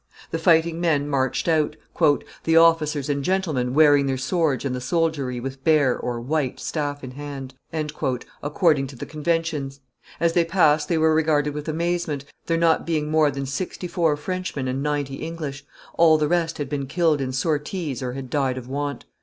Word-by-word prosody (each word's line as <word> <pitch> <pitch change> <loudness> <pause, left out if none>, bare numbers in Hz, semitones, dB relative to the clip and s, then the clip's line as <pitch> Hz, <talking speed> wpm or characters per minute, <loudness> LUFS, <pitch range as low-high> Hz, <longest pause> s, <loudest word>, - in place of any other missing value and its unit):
The 165 - -1
fighting 165 0 +3
men 150 -4 +1
marched 135 0 0
out, 155 -2 +2 0.7
"the 165 0 +3
officers 155 -4 +4
and 140 -1 -1
gentlemen 150 -9 0
wearing 145 -2 +5
their 135 -1 0
swords 140 0 0
and 135 - -1
the 125 - -4
soldiery 140 -3 0
with 135 +1 -6
bare 145 -5 +3
(white) 125 +3 -2
staff 145 -2 -3
in 130 - -6
hand," 135 -1 -7 0.9
according 150 -2 +2
to 135 - -11
the - - -6
conventions; 155 -3 -2 0.4
as 170 0 +2
they 175 - +4
passed 155 -4 +3
they 170 - +2
were 160 0 +4
regarded 150 -2 +2
with 150 +1 -6
amazement, 165 -3 -1 0.2
there 165 - +1
not 165 -1 +3
being 155 -2 -1
more 155 -1 +4
than 140 -1 -4
sixty 180 +6 -4
four 165 -4 +1
Frenchmen 180 -4 -3
and 130 +1 -2
ninety 145 -2 -2
English: 155 -4 -6 0.3
all 160 -2 +7
the 150 -1 +1
rest 165 0 0
had 145 - -3
been 140 -1 -3
killed 160 -1 +2
in 130 -1 -2
sorties 150 +1 -2
or 125 -1 -3
had 130 -1 -7
died 135 -3 0
of 125 -1 -7
want. 140 -1 -4
150 Hz, 180 wpm, -23 LUFS, 135-165 Hz, 0.9 s, all